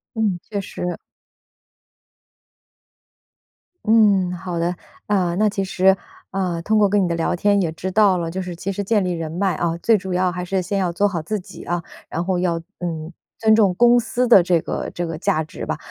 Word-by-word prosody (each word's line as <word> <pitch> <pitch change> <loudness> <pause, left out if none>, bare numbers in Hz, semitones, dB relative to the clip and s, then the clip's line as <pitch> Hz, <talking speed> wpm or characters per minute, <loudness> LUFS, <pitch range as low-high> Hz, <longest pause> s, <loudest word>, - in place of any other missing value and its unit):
嗯， 210 -5 0
确 200 +1 -4
实。 180 -1 -5 2.9
嗯， 205 -5 +4
好 180 -1 -5
的。 175 +2 0 0.3
呃， 180 -4 +1
那 215 +2 +3
其 195 -1 -1
实， 190 0 +3 0.4
呃， 180 -3 -1
通 215 +4 +2
过 205 -1 +4
跟 200 0 +3
你 180 - +1
的 170 - -1
聊 165 +2 0
天 200 +2 +2
也 165 -3 -1
知 185 +3 -5
道 200 -2 +4
了， 165 -1 -3
就 190 - -3
是 180 -1 -6
其 195 +3 -4
实 200 +1 -3
建 210 0 +2
立 180 - -1
人 165 -2 -4
脉 190 +2 0
啊， 170 -1 -1
最 225 +6 +3
主 190 -1 -6
要 180 0 +1
还 180 +1 -4
是 190 +1 -1
先 195 +2 -2
要 180 -2 0
做 200 +4 +2
好 175 -5 -3
自 210 +6 -3
己 190 +1 -11
啊。 175 -1 -2 0.3
然 170 - -2
后 185 -1 0
要 170 -2 0 0.2
嗯， 165 -1 -4 0.2
尊 220 -1 +4
重 205 -5 +4
公 240 +3 +5
司 245 +2 -1
的 230 -6 +8
这 175 -1 +2
个 - - -4
这 175 - -3
个 165 -1 -5
价 180 -5 +1
值 155 - -8
吧。 - - -2
185 Hz, 225 characters per minute, -21 LUFS, 175-205 Hz, 2.9 s, 的